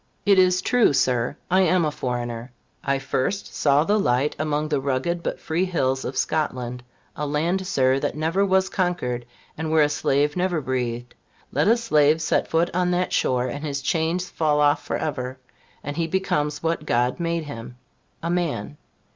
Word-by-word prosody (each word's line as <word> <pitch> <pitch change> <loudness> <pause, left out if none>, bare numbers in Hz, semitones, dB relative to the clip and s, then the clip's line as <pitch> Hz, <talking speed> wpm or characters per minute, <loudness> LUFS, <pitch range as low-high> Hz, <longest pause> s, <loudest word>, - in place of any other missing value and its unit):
It 200 -2 +5
is 185 0 +4
true, 245 -11 +3
Sir 125 0 +1
I 185 +1 +5
am 180 -1 +3
a 150 - 0
foreigner. 120 -2 -4 0.3
I 140 0 +1
first 135 +7 -2
saw 145 0 +3
the 210 +5 +2
light 130 -3 +1
among 150 0 -1
the 145 -3 0
rugged 140 +6 -1
but - - -3
free 165 +3 -1
hills 135 -7 0
of 130 - -4
Scotland; 125 -5 -1 0.3
a 150 - -3
land, 170 +6 0
Sir, 130 -2 +2
that - - -2
never 165 +5 +1
was 190 -1 +3
conquered, 125 -10 -2 0.3
and 160 0 -3
where 160 -1 +4
a 145 - +2
slave 145 0 +1
never 180 -2 0
breathed. 125 -3 -3 0.4
Let - - +1
a 230 +3 +5
slave 155 -9 +3
set 155 - +1
foot 165 +2 +1
on 180 0 +1
that 180 0 0
shore, 125 -1 +1
and 140 +4 -5
his 140 -2 -2
chains 165 +4 0
fall 150 -2 +1
off 145 +1 +3
for - - -2
ever, 130 -4 -3 0.5
and 145 +1 -4
he 165 -1 0
becomes 150 -5 -1
what 165 -2 -1
God 125 +4 +1
made 170 -1 -1
him 125 -4 -8 0.5
a 170 - -1
man. 145 - -2
150 Hz, 180 wpm, -24 LUFS, 130-175 Hz, 0.5 s, It